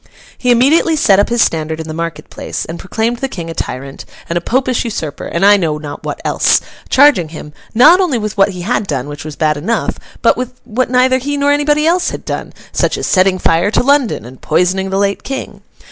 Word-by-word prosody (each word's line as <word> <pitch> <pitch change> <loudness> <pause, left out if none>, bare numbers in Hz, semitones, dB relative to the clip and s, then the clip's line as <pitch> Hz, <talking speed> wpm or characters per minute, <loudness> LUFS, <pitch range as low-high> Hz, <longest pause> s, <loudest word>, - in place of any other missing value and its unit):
He 250 - -2
immediately 280 +7 +4
set 200 -10 +4
up 205 - +2
his 235 -1 +3
standard 160 0 -2
in 160 - -6
the 155 - -5
market 165 0 -5
place, - - -5
and 165 +1 -7
proclaimed 225 +5 -2
the 270 - -2
King 170 -10 -6
a - - -5
tyrant, 135 -2 -6 0.2
and 170 - -3
a 175 - 0
Popish 255 +4 0
usurper, 165 - -5
and 170 +3 0
I 205 0 +7
know 160 -5 -1
not 145 -1 -8
what - - -4
else; - - +3 0.3
charging 260 - +4
him, 150 -1 -10 0.2
not 290 +10 +7
only 325 -9 +1
with 215 -2 -4
what 200 -1 +3
he 180 -2 -7
had 210 0 -1
done, 135 -4 -2
which 145 0 -7
was 155 -1 -7
bad 155 -1 +1
enough, 215 +11 -2 0.2
but - - +4
with 250 0 -6
what 250 +2 -1
neither 255 +1 +3
he 285 +3 -3
nor 285 0 +2
anybody 295 +1 +2
else 350 +2 +2
had - - -7
done, - - -4 0.2
such - - 0
as - - -3
setting 185 0 +3
fire 170 +2 +2
to 220 - +1
London, 275 - +1
and 125 +1 -13
poisoning 190 +2 +1
the 190 - -1
late 200 0 0
King. 270 0 -6
200 Hz, 225 wpm, -15 LUFS, 165-255 Hz, 0.3 s, I